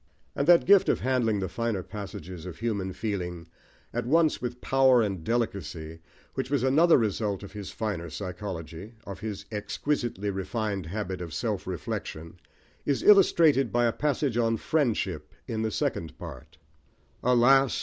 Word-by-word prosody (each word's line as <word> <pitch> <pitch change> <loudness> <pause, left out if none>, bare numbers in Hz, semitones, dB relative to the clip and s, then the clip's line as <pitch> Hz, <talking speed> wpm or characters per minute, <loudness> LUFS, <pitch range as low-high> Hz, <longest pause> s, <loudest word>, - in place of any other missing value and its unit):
And 140 - -1
that 175 -1 +7
gift 195 +1 +6
of - - +1
handling 120 -5 +1
the 95 - -1
finer 115 -3 -2
passages 95 -4 -8
of 90 - -8
human 100 -5 -2
feeling, 90 -5 -4 0.5
at 120 0 -2
once 160 +2 +3
with 125 0 -4
power 130 -1 +4
and 95 -5 -3
delicacy, 85 -7 -3 0.3
which 125 - -3
was 140 -3 +1
another 155 +6 +5
result 105 -3 -1
of 100 - -9
his 105 -3 -7
finer 100 -7 -3
psychology, 90 +2 -6
of 100 - -7
his 110 -3 -5
exquisitely 105 -1 -2
refined 95 -1 -3
habit 95 0 -4
of 85 -2 -6
self 105 -5 -2
reflection, 85 -1 -5 0.4
is 140 -2 0
illustrated 165 - +5
by 120 0 +2
a 115 - +2
passage 145 -4 0
on 115 -1 +2
Friendship 110 - -1
in 110 -1 -3
the 110 - 0
Second 85 -5 -2
Part 75 - -10 0.6
Alas! 125 +2 +5
110 Hz, 150 wpm, -27 LUFS, 95-125 Hz, 0.6 s, that